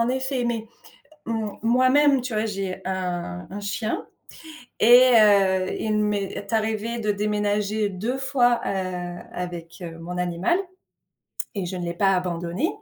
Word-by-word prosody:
en 230 - +2
effet, 260 0 -1
mais 230 -2 -2 0.6
m 220 -2 -2
moi-même, 255 +4 +4
tu 250 -2 -5
vois? 215 +1 0
J'ai 195 -3 -4
un 180 - -3
un 205 +2 -6
chien 200 +2 -3 0.7
et 245 +3 +7
heu, 195 -3 +4
il 215 -1 0
m'est 210 +1 -2
arrivé 220 +1 -1
de 215 -1 +1
déménager 210 0 0
2 215 +7 -3
fois, 245 -3 +2
heu, 180 -2 -3 0.2
avec, 175 -1 -6
heu, 165 -2 -7
mon 175 +2 -6
animal 180 - +1 1.0
et 195 -4 -2
je 185 - -4
ne 175 - -4
l'ai 170 0 -3
pas 195 +2 +3
abandonné. 175 - -1
205 Hz, 145 wpm, -24 LUFS, 185-230 Hz, 1.0 s, et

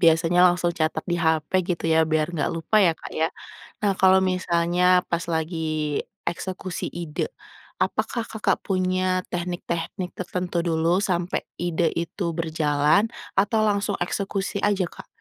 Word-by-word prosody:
biasanya 165 +1 +4
langsung 175 -1 +1
catat 155 0 0
di 175 - +1
hape, 160 +1 +1
gitu, 170 -2 -3
ya, 160 0 +4
biar 155 -1 +1
nggak 150 - 0
lupa, 165 +6 0
ya, 170 - +5
Kak, - - -11
ya. 160 +1 +2 0.5
Nah, 205 -1 +2
kalau 190 0 +6
misalnya, 180 -1 +3
pas 170 +1 -1
lagi 160 -2 -1 0.3
eksekusi 185 0 -4
ide, 170 - -3 0.5
apakah 235 -2 0
Kakak 220 - 0
punya 185 -1 +1
teknik-teknik 175 +1 -3
tertentu 180 -1 -2
dulu, 165 +2 +2
sampai 180 -3 -1 0.2
ide 170 -1 +1
itu 170 +3 -3
berjalan, 155 +3 +2 0.3
atau 205 +3 +3
langsung 205 -1 +1
eksekusi 195 +1 -2
aja, 200 -3 +2
Kak? - - -12
175 Hz, 140 wpm, -24 LUFS, 165-185 Hz, 0.5 s, kalau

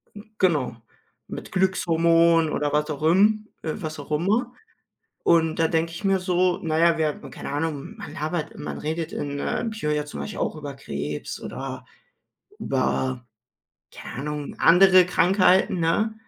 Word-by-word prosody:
Hm, 210 +2 -12
genau, 150 -10 +1 0.5
mit - - -8
Glückshormonen 170 -3 +3
oder 145 0 -1
was 150 +1 +1
auch 150 0 -4
imm 210 +6 +3 0.2
äh, 155 - -2
was 155 -6 -6
auch 145 +2 -10
immer. 215 +10 +1 0.7
Und 165 -1 +3
da 165 - +4
denke 165 0 0
ich 165 - -8
mir 195 -1 +3
so: 180 -1 +1
Na 160 -1 0
ja, 170 -1 +4
wir 155 -1 +2
haben 145 -2 -8
keine - - -7
Ahnung, 150 +7 -3
man 200 - -8
labert 155 +2 -4
man - - -5
redet 160 +1 -3
in, 145 0 -4
äh, - - -2
Bio 215 -9 -2
ja 150 0 -1
zum 150 - -7
Beispiel 215 - -6
auch - - -1
über 145 -2 -7
Krebs 75 - -5
oder - - -6 0.7
über, 130 -2 -1 0.7
keine - - -9
Ahnung, 150 0 -5
andere 185 +1 +7
Krankheiten, 185 0 +3
ne? 215 +7 +1
165 Hz, 160 wpm, -24 LUFS, 150-185 Hz, 0.7 s, andere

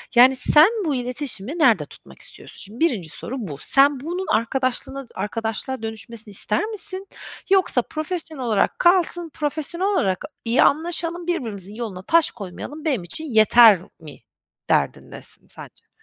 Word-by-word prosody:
Yani, 255 +2 +7
sen 305 +7 +7 0.2
bu 290 -3 0
iletişimi 250 - -4
nerede - - +3
tutmak - - -16
istiyorsun? - - -10
Şimdi 210 +4 -9
1'inci 195 - -2
soru 255 - -4
bu. 155 -11 -7
Sen, 275 0 +4
bunun 350 +6 -5
arkadaşlığına 255 +4 -1
d - - -22
arkadaşlığa 225 +3 -4
dönüşmesini 220 -1 -4
ister 210 - +4
misin 395 -2 -1 0.4
yoksa 375 -10 +3
profesyonel 310 -1 -5
olarak 220 -4 0
kalsın, 350 -1 +3
profesyonel 315 +5 -2
olarak 205 - -1 0.2
iyi 230 +2 +3
anlaşalım, 335 +2 -1
birbirimizin 215 - -3
yoluna 215 -6 -6
taş 330 +5 +3
koymayalım 235 - -9
benim 260 - -1
için 315 - -6
yeter 220 - +6 0.2
mi 150 -4 -12 0.5
derdindesin - - -2
sence? - - -11
265 Hz, 140 wpm, -21 LUFS, 220-330 Hz, 0.5 s, Yani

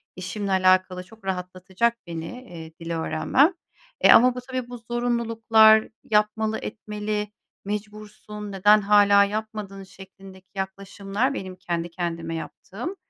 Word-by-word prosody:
işimle 195 +2 -4
alakalı 185 -1 +3
çok 215 +2 -18
rahatlatacak 190 +5 -2
beni, 165 -1 -5 0.2
eee, 165 -7 -11
dil 165 0 -6
öğrenmem. 255 - +2 0.5
E, - - +7
ama 250 +2 +6
bu - - -4
tabii, 255 -1 -5
bu 245 - -7
zorunluluklar, 230 -2 +3 0.2
yapmalı, 215 +1 +1
etmeli, 210 -1 -4 0.4
mecbursun, 210 0 -7
neden 205 +2 +4
hâlâ 200 0 +5
yapmadın 210 -1 -5
şeklindeki 190 0 -15
yaklaşımlar, 195 +5 -3
benim 185 -7 -6
kendi 175 -1 -4
kendime 165 -1 -4
yaptığım, 220 - -7
205 Hz, 120 wpm, -24 LUFS, 185-220 Hz, 0.5 s, E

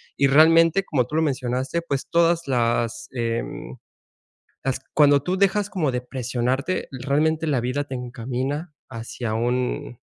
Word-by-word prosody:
Y 140 - +3
realmente, 165 +5 +5
como 140 -9 0
tú 150 - -5
lo 160 - +3
mencionaste, 130 +1 -1
pues, 140 -5 -3
todas 170 -1 +2
las, 115 -2 0
em, 115 - -4 0.9
las 135 -1 -1
cuando 145 -2 +5
tú 180 +5 -1
dejas 200 +1 +2
como 160 -9 0
de 125 0 -2
presionarte, 130 +6 -2
realmente 150 +5 0
la 135 -5 +1
vida 125 +4 -1
te 135 - -6
encamina 130 +6 -4 0.2
hacia 115 0 -5
un 125 +3 -2
135 Hz, 140 wpm, -23 LUFS, 125-160 Hz, 0.9 s, realmente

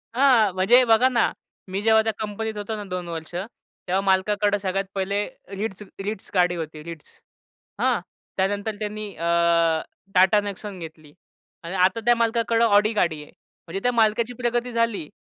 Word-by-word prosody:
हां, 245 -8 +4
म्हणजे 215 +7 +5
बघा 230 +3 +5
ना. 235 -2 +2 0.4
मी 195 +2 -2
जेव्हा 220 0 +5
त्या 220 - 0
कंपनीत 215 0 -4
होतो 205 +2 -4
ना 210 - -6
2 180 -1 -4
वर्ष, 165 -1 -7 0.5
तेव्हा 185 +2 +1
मालकाकडं 205 +2 +2
सगळ्यात 195 0 -2
पहिले 195 +1 -1 0.4
Ritz 210 -2 -4 0.2
Ritz 210 -1 -5
गाडी 180 -2 +3
होती. 155 -2 -6
Ritz, 165 -2 -10 0.7
हां? - - +2 0.4
त्यानंतर 205 +3 -1
त्यांनी 215 0 -4
अ, 165 - -5 0.9
टाटा 190 +3 +5
नेक्सॉन 200 -1 -7
घेतली 155 -2 -11 0.5
आणि 170 +3 -5
आता 185 +4 +3
त्या 240 0 +5
मालकाकडं 230 0 +2
ऑडी 210 +1 +4
गाडी 160 -7 0
आहे. - - -17 0.4
म्हणजे 190 +4 -4
त्या 245 - +3
मालकाची 225 +1 +2
प्रगती 240 0 -1
झाली. 230 -9 0
205 Hz, 160 wpm, -24 LUFS, 185-225 Hz, 0.9 s, म्हणजे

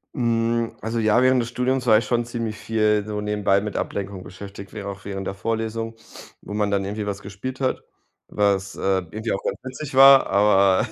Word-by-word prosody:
Hm, 115 -2 0
also 115 +1 -3
ja, 110 +2 +3
während 130 -1 +4
des 115 - -4
Studiums 125 +1 -1
war 110 -2 +7
ich 110 - 0
schon 120 +1 +1
ziemlich 115 -2 -4
viel 110 -2 +1
so 105 -1 -4
nebenbei 105 -1 +1
mit 105 -1 -5
Ablenkung 100 -2 -4
beschäftigt, 100 +1 -10
wäre 105 -2 -7
auch 100 0 -9
während 95 -1 -5
der - - -3
Vorlesung, 115 +2 -3 0.5
wo - - -8
man 105 -1 0
dann 100 -1 0
irgendwie 105 +1 -4
was 100 -1 -4
gespielt 115 +7 -7
hat, 130 -1 -1 0.4
was, 100 -1 0
äh, - - -10 0.3
irgendwie 110 +4 -4
auch 95 - -4
ganz - - -2
witzig 130 +2 -7
war, 135 0 +8
aber 100 +1 +4
110 Hz, 200 wpm, -23 LUFS, 100-120 Hz, 0.5 s, war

